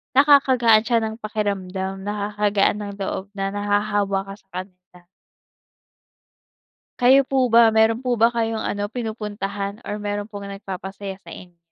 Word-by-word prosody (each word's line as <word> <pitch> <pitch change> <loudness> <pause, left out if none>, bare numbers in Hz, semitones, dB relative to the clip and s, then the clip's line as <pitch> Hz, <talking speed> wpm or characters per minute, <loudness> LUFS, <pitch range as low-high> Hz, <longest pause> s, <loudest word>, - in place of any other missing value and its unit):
nakakagaan 260 -6 +5
siya 235 -1 +3
ng 220 0 -3
pakiramdam, 195 -3 -3
nakakagaan 205 0 0
ng 200 0 -6
loob 190 0 -3
na 195 -1 -2
nahahawa 205 -1 0
ka 195 - -7
sa - - -33
kanila. 180 -1 -19 2.0
Kayo 265 +2 +6
po 260 -1 +1
ba, 230 -1 +6
meron 225 +3 +3
po 250 - +2
ba 230 0 +4
kayong 225 -2 -1
ano, 205 0 -2
pinupuntahan 205 -2 -5
or 210 - -5
meron 205 0 -4
pong 205 -1 -8
nag-papasaya 195 0 -7
sa - - -9
inyo? 175 -2 -13
205 Hz, 140 wpm, -22 LUFS, 195-225 Hz, 2.0 s, Kayo